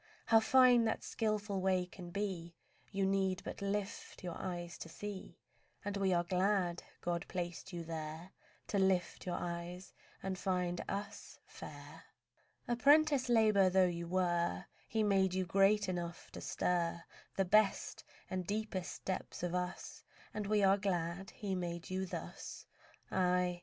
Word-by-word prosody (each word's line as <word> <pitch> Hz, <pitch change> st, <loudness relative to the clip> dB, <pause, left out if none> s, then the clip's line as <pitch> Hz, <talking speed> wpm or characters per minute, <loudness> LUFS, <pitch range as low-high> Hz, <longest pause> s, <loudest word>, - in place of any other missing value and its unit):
How 225 Hz, -1 st, +6 dB
fine 245 Hz, 0 st, +6 dB
that 220 Hz, -, 0 dB
skilful 210 Hz, -3 st, -1 dB
way 185 Hz, -1 st, +2 dB
can 180 Hz, 0 st, -10 dB
be 175 Hz, -3 st, -3 dB, 0.4 s
You 195 Hz, -1 st, +1 dB
need 190 Hz, -1 st, +1 dB
but -, -, -6 dB
lift 200 Hz, -1 st, -3 dB
your 175 Hz, -2 st, -4 dB
eyes 175 Hz, -2 st, -5 dB
to 165 Hz, -, -7 dB
see; 200 Hz, +3 st, -7 dB, 0.5 s
And 205 Hz, 0 st, -2 dB
we 195 Hz, -1 st, +2 dB
are 175 Hz, -1 st, +3 dB
glad 180 Hz, -1 st, +1 dB, 0.2 s
God 170 Hz, -1 st, -1 dB
placed 175 Hz, +1 st, -4 dB
you 170 Hz, -2 st, -4 dB
there 160 Hz, +2 st, -6 dB, 0.4 s
To 200 Hz, -, +1 dB
lift 190 Hz, -1 st, +1 dB
your 175 Hz, -, 0 dB
eyes 175 Hz, +1 st, -5 dB, 0.3 s
and 190 Hz, -1 st, -2 dB
find 180 Hz, -2 st, 0 dB
us 205 Hz, +1 st, -5 dB
fair. -, -, -10 dB, 0.6 s
Apprentice 280 Hz, +2 st, +5 dB
labour 215 Hz, -5 st, +5 dB
though 185 Hz, 0 st, +5 dB
you 170 Hz, -1 st, -2 dB
were, 175 Hz, -, +1 dB, 0.2 s
He 220 Hz, -1 st, +1 dB
made 190 Hz, -3 st, +3 dB
you 185 Hz, 0 st, +1 dB
great 195 Hz, +3 st, +4 dB
enough 175 Hz, -2 st, -4 dB
to -, -, -8 dB
stir 170 Hz, -1 st, 0 dB, 0.3 s
The 195 Hz, -, +3 dB
best 215 Hz, +2 st, +3 dB, 0.2 s
and 185 Hz, -2 st, -3 dB
deepest 205 Hz, -3 st, -3 dB
depths 185 Hz, -2 st, -3 dB
of 175 Hz, -1 st, -1 dB
us, 180 Hz, 0 st, -3 dB, 0.3 s
And 210 Hz, -1 st, -3 dB
we 210 Hz, -1 st, +3 dB
are 195 Hz, +1 st, +5 dB
glad 185 Hz, 0 st, -1 dB
He 205 Hz, -3 st, -4 dB
made 175 Hz, -1 st, -3 dB
you 190 Hz, 0 st, -1 dB
thus. -, -, -7 dB, 0.5 s
Aye! 180 Hz, -1 st, +2 dB
185 Hz, 150 wpm, -35 LUFS, 175-200 Hz, 0.6 s, How